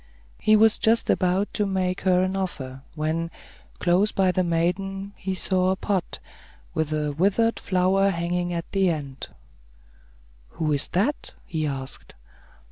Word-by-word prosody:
He 215 - +4
was 220 0 +5
just 225 +1 +3
about 185 +2 +1
to 210 - 0
make 185 -1 -1
her 185 -1 +3
an 185 +1 -1
offer, 135 -9 -4
when, 160 +2 -1 0.5
close 185 +4 +3
by 190 -1 +2
the 185 0 +1
maiden, 195 +4 -1
he 190 0 -3
saw 185 0 +2
a 190 - +2
pod, 190 -2 -2 0.6
with 160 -1 -1
a 150 -1 0
withered 200 +9 +2
flower 190 +1 +2
hanging 175 0 -1
at 170 -1 -3
the 195 -2 +3
end. 140 -5 -4 1.3
"Who 155 -1 0
is 140 - +1
that?" 225 +12 -1
he 160 -4 -2
asked. 135 -1 -6
185 Hz, 145 wpm, -25 LUFS, 165-195 Hz, 1.3 s, was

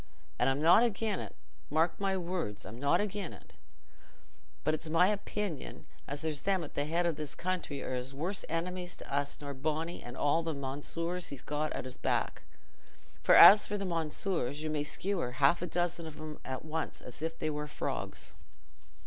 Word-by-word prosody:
And 125 - +4
I'm 135 +1 +1
not 165 +8 +7
again' 220 -3 +1
it—mark 160 +3 -2
my 195 -1 +1
words—I'm 160 - -4
not 140 +1 +3
again' 205 -3 -2
it. - - -15 1.1
But 155 - +2
it's 155 +1 -4
my 170 +4 +5
opinion 205 -5 -3 0.2
as 145 +1 -4
there's 155 -3 -1
them 190 -3 +1
at 150 - -8
the 145 - 0
head 170 +3 +1
o' 170 - +3
this 150 -2 -5
country 175 -6 -2
as 125 0 -3
are - - -13
worse 180 +7 -2
enemies 175 +2 -2
to - - -9
us 145 0 0
nor 145 -1 -5
Bony 155 +5 -2
and 120 +1 -8
all 145 +3 +3
the 165 -2 -2
mounseers 165 +6 -3
he's 140 - -7
got 150 +1 -1
at - - -4
's 130 0 -7
back; - - 0 0.8
for - - +6
as 205 +1 +10
for 205 - -1
the 200 - -3
mounseers, 160 -3 -1
you 155 - -2
may 150 -1 0
skewer 170 -5 -1
half 140 +6 +4
a 180 - -2
dozen 175 -1 -1
of 155 - -9
'em 155 -1 -7
at 130 +3 -5
once 160 +1 -3
as 125 +3 -9
if 165 +1 -3
they 155 - -1
war 150 0 -3
frogs. - - -4
160 Hz, 190 wpm, -32 LUFS, 145-180 Hz, 1.1 s, as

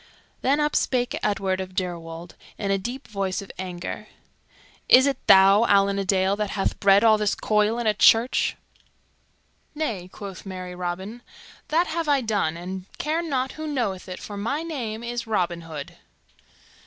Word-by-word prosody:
Then 280 +3 +2
up 295 0 0
spake 245 -1 0
Edward 190 -2 0
of 185 0 -8
Deirwold 170 -2 -5 0.2
in 200 -2 -2
a 195 - +1
deep 245 +7 -6
voice 195 -3 -2
of 200 - -8
anger, 180 -1 -6 0.8
"Is 260 +1 +8
it 275 -2 0
thou, 195 +3 +7
Allan 200 -2 +3
a - - 0
Dale, 190 0 +2
that 210 -1 -1
hath 195 -1 -2
bred 200 +1 +5
all 220 -1 +5
this 210 -1 +1
coil 210 +1 +1
in 240 - -2
a 215 - +3
church?" 225 +4 +4 1.2
"Nay," 225 - -3
quoth 200 -3 -9
merry 185 -2 -7
Robin, 185 +6 -5 0.5
"that 330 +3 +2
have 330 -1 -3
I 280 -2 +3
done, 200 -8 -1
and 185 +2 -7
I - - -20
care 315 +3 -1
not 265 -6 -1
who 315 0 -6
knoweth 220 -11 -2
it, 180 - -6
for 205 - -8
my 280 +10 -2
name 235 -9 -5
is 235 -1 -4
Robin 175 -5 -1
Hood." 155 -3 -8
205 Hz, 170 wpm, -24 LUFS, 185-245 Hz, 1.2 s, Is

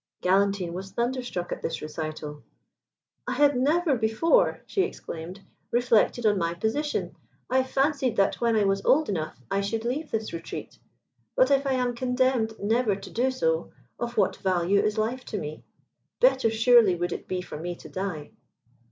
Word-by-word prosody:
Galantine 190 -1 +2
was 190 +2 -6
thunderstruck 240 -7 -2
at - - -4
this - - -3
recital. 155 -1 -6 0.9
"I - - -1
had 290 -1 +4
never 300 +4 +2
before," 245 - +2
she 390 - 0
exclaimed, 175 - -5 0.3
"reflected 240 -1 +2
on 205 -2 +3
my 170 0 -1
position. 290 - -2 0.4
I 260 +1 +4
fancied 270 -1 0
that 195 +2 +1
when 235 -1 +2
I 215 - +3
was 195 0 +1
old 305 +3 +3
enough 160 -9 -3
I 195 - +1
should 225 +3 -2
leave 290 +6 -2
this 220 -3 -3
retreat: 165 - -7 0.6
but - - +4
if 275 0 +3
I 270 - +2
am 250 -1 0
condemned 250 -2 +1
never 220 0 +1
to 195 0 -10
do 250 +3 +1
so, 485 - -1 0.3
of 240 0 -4
what - - +2
value 185 0 +2
is 215 0 -1
life 235 +4 -1
to 215 - -4
me? 155 -4 -6 0.6
Better 265 - +4
surely 225 -3 +5
would 175 +1 -2
it - - -7
be 185 -1 -2
for 150 - -8
me 175 +2 -4
to - - -12
die." 185 -6 -5
220 Hz, 170 wpm, -26 LUFS, 190-260 Hz, 0.9 s, surely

